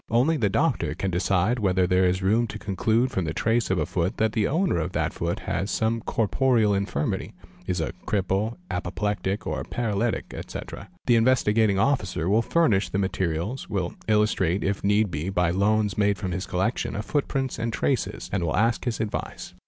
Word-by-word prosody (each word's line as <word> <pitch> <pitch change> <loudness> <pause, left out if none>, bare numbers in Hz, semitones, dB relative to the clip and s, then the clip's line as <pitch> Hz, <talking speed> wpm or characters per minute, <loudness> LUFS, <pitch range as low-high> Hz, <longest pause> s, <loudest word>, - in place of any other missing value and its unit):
Only 125 +8 +3
the 110 -9 +1
doctor 95 - 0
can 95 +1 -2
decide 95 +6 +1
whether 95 -3 +2
there 90 +1 +3
is 90 +1 +1
room 110 +5 +3
to 110 - -6
conclude 110 +5 0
from 95 -8 -1
the 75 0 -3
trace 115 +1 +1
of 95 - +1
a 75 - +1
foot 90 +6 -1
that 110 -1 +2
the 105 -2 +1
owner 170 - +1
of 80 - -3
that - - -1
foot - - -2
has 95 - -2
some 115 +1 0
corporeal 115 0 +2
infirmity 100 -7 -2 0.3
(is - - -1
a - - -2
cripple, 100 +3 0
apoplectic, 100 +1 -2
or - - -2
paralytic, 115 -1 -2
etc.). 100 - -7 0.2
The 120 -2 +4
Investigating 115 -4 +3
Officer 100 - +1
will 105 +4 +4
furnish 115 -9 +2
the - - -2
materials, 95 +4 -2
will 95 -5 -2
illustrate 105 -4 +2
if 100 0 -1
need 105 0 +2
be 85 +3 -3
by 90 -3 +1
loans 105 +2 +1
made 100 -1 +3
from 95 -3 -4
his 90 +2 -3
collections 95 +5 -1
of 105 - -4
footprints 135 -4 -1
and 115 0 -1
traces, 125 +2 -1
and 95 -4 0
will 85 - 0
ask 115 +3 +1
his 120 -3 -1
advice. 110 -2 -4
105 Hz, 185 wpm, -25 LUFS, 95-115 Hz, 0.3 s, The